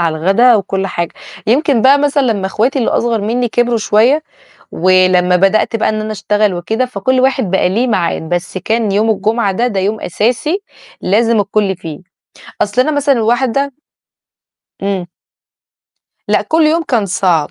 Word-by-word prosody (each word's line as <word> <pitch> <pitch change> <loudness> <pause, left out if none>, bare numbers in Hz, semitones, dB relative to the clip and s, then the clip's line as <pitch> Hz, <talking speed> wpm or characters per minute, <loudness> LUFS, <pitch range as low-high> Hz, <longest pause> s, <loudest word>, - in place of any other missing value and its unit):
على 165 -2 0
الغدا 195 +9 +4
وكل 195 -2 -1
حاجة، 170 -3 -4 0.3
يمكن 260 0 +2
بقى 275 +2 +5
مثلًا 285 0 +1
لمّا 195 -2 -3
إخواتي 235 +8 0
اللي 235 - 0
أصغر 230 -2 0
منّي 240 +4 -1
كبروا 240 0 0
شوية 230 +8 +2 0.5
ولمّا 185 0 +3
بدأت 195 +5 +2
بقى 225 - 0
إن 215 0 -2
أنا 215 0 -4
أشتغل 210 0 0
وكده، 220 +8 -2
فكل 250 +2 -1
واحد 260 -6 +1
بقى 190 -1 +2
ليه 230 +7 0
معاد، 185 -7 -1
بس 175 +1 -3
كان 220 +3 -1
يوم 210 +3 +1
الجمعة 215 0 0
ده، 235 +6 0
ده 205 -5 -2
يوم 210 +3 -2
أساسي 250 - -1 0.4
لازم 225 +3 +2
الكل 200 -1 0
فيه. 160 -3 -8 0.6
أصل 210 +5 +1
أنا 310 - 0
مثلًا 285 -4 +1
واحدة 260 +4 0 1.1
إمم. 195 -2 -2 1.2
لأ، - - +2
كل 320 +1 +1
يوم 315 +2 +2
كان 235 -9 -1
صعب. 180 -5 0
215 Hz, 160 wpm, -14 LUFS, 190-250 Hz, 1.2 s, بقى